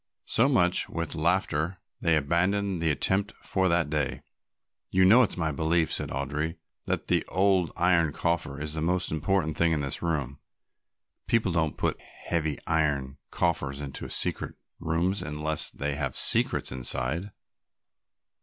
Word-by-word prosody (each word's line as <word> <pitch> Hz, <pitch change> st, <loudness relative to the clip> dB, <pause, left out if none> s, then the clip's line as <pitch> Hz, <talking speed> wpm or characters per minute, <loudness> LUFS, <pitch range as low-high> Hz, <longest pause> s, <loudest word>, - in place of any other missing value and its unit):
So 115 Hz, -, +3 dB
with 140 Hz, -, +2 dB
much 90 Hz, -3 st, +2 dB, 0.2 s
laughter 85 Hz, +1 st, 0 dB, 0.2 s
they 85 Hz, -, +2 dB
abandoned 90 Hz, +5 st, 0 dB
the 80 Hz, -, +2 dB
attempt 95 Hz, +8 st, +1 dB
for 95 Hz, -1 st, +1 dB
that 85 Hz, -3 st, +1 dB
day. 75 Hz, -3 st, -2 dB, 0.7 s
"You 95 Hz, 0 st, +4 dB
know 110 Hz, +7 st, +7 dB
it's 110 Hz, -7 st, +1 dB
my 80 Hz, -2 st, 0 dB
belief," 80 Hz, +3 st, +1 dB
said -, -, +1 dB
Audry, 75 Hz, +4 st, -3 dB, 0.3 s
"that -, -, -1 dB
that -, -, +1 dB
old 95 Hz, -1 st, +2 dB
iron 85 Hz, -3 st, +3 dB
coffer 85 Hz, -3 st, -1 dB
is 75 Hz, 0 st, -3 dB
the 80 Hz, -, -3 dB
most 90 Hz, +2 st, 0 dB
important 80 Hz, 0 st, 0 dB
thing 85 Hz, -1 st, +3 dB
in 75 Hz, -, 0 dB
this 70 Hz, 0 st, -3 dB
room; 75 Hz, -5 st, -2 dB, 0.9 s
people 115 Hz, -5 st, +2 dB
don't 80 Hz, -4 st, 0 dB
put -, -, 0 dB
great -, -, -20 dB, 0.2 s
heavy 80 Hz, -4 st, 0 dB
iron 70 Hz, -4 st, 0 dB
coffers 70 Hz, -5 st, -1 dB
into 70 Hz, -2 st, -6 dB
secret -, -, -1 dB, 0.2 s
rooms 85 Hz, +5 st, 0 dB
unless 75 Hz, +1 st, -1 dB
they 70 Hz, +1 st, -3 dB
have 70 Hz, -2 st, -3 dB
secrets -, -, +3 dB
inside." 65 Hz, +8 st, -2 dB
80 Hz, 150 wpm, -27 LUFS, 75-90 Hz, 0.9 s, know